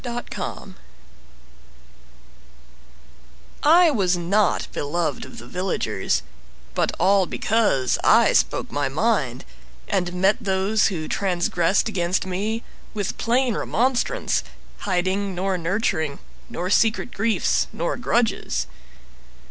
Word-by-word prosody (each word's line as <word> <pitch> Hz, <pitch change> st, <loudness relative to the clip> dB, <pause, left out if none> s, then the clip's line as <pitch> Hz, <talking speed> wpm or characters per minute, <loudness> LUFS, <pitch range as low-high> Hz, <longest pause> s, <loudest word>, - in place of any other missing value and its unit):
Dorcas 240 Hz, -1 st, -5 dB
Gustine -, -, -6 dB, 2.9 s
I 335 Hz, +2 st, +6 dB
was 185 Hz, -8 st, +1 dB
not 195 Hz, +5 st, +1 dB
beloved 150 Hz, 0 st, -2 dB
of -, -, -12 dB
the -, -, -9 dB
villagers, 180 Hz, +8 st, -1 dB, 0.5 s
But -, -, +1 dB
all 190 Hz, +1 st, +4 dB
because 210 Hz, -, +1 dB
I -, -, +5 dB
spoke -, -, +1 dB
my -, -, -1 dB
mind, -, -, 0 dB, 0.4 s
And 180 Hz, -2 st, -1 dB
met 190 Hz, +4 st, +3 dB
those 195 Hz, +2 st, +2 dB
who 160 Hz, -6 st, -3 dB
transgressed 180 Hz, +1 st, +1 dB
against 185 Hz, -3 st, 0 dB
me 210 Hz, +5 st, -2 dB, 0.3 s
With 205 Hz, -2 st, -3 dB
plain 245 Hz, +1 st, +2 dB
remonstrance, 260 Hz, -, 0 dB, 0.4 s
hiding 190 Hz, +1 st, -1 dB
nor 190 Hz, +1 st, -1 dB
nurturing 165 Hz, -5 st, -1 dB, 0.3 s
Nor 180 Hz, +2 st, -3 dB
secret 225 Hz, +3 st, +2 dB
griefs 220 Hz, -2 st, +1 dB
nor 170 Hz, -, -2 dB
grudges. 240 Hz, -2 st, 0 dB
195 Hz, 105 wpm, -23 LUFS, 175-225 Hz, 2.9 s, I